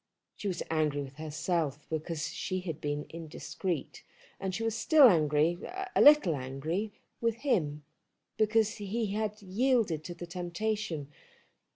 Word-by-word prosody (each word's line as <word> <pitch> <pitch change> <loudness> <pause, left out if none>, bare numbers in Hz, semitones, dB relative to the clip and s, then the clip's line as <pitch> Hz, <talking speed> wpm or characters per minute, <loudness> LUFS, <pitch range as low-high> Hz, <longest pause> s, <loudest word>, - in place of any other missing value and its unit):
She 205 - -5
was 180 -3 -2
angry 150 -3 +1
with 135 +1 -11
herself 155 -1 -2
because 160 0 -3
she 185 +2 -3
had 165 -4 -5
been 145 0 -2
indiscreet, 165 +1 -5 0.4
and 190 -1 -2
she 225 - -2
was 225 -1 0
still 280 +5 +7
angry, 155 -2 +3 0.4
a - - +5
little 295 - +8
angry 145 +10 -3 0.3
with 230 -1 +1
him, 155 - 0 0.5
because 220 0 +2
he 210 +1 -2
had 210 0 -2
yielded 200 - +1
to 175 - -6
the 175 - -7
temptation. 175 -3 -3
175 Hz, 140 wpm, -31 LUFS, 155-215 Hz, 0.5 s, little